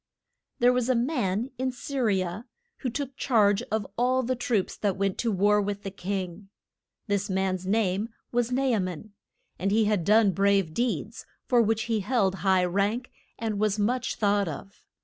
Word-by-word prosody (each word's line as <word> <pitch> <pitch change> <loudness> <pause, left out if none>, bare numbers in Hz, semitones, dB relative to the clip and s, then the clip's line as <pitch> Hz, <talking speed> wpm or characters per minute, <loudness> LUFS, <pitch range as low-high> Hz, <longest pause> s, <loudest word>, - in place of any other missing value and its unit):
There 245 +1 +4
was 250 0 0
a 255 - +3
man 235 - 0
in 260 0 0
Sy 275 +3 -6
ri 210 -6 +2
a, 185 +6 -5 0.3
who 260 - -3
took 270 +2 -4
charge 210 -5 +3
of 215 -2 0
all 255 +1 +2
the 255 +2 0
troops 235 -5 -1
that 200 -3 -1
went 195 -1 -1
to 235 - +1
war 205 +2 +3
with 205 0 -3
the 195 - -5
king. 190 0 -5 0.6
This 205 -1 -1
man's 190 -1 -1
name 205 0 +1 0.2
was 245 0 0
Na 260 +2 +1
a 250 -5 +2
man, 185 +2 -5 0.5
and 195 - 0
he 215 +2 +3
had 205 -4 +1
done 210 +2 +5
brave 195 -3 +2
deeds, 225 - -2 0.2
for 245 -2 +4
which 220 0 +1
he 225 -2 0
held 200 -2 +1
high 190 -2 +3
rank, 200 +7 -1 0.3
and 220 -3 -2
was 215 -1 +1
much 240 +4 0
thought 205 -2 +1
of. 165 +6 -8
210 Hz, 185 wpm, -27 LUFS, 195-240 Hz, 0.6 s, done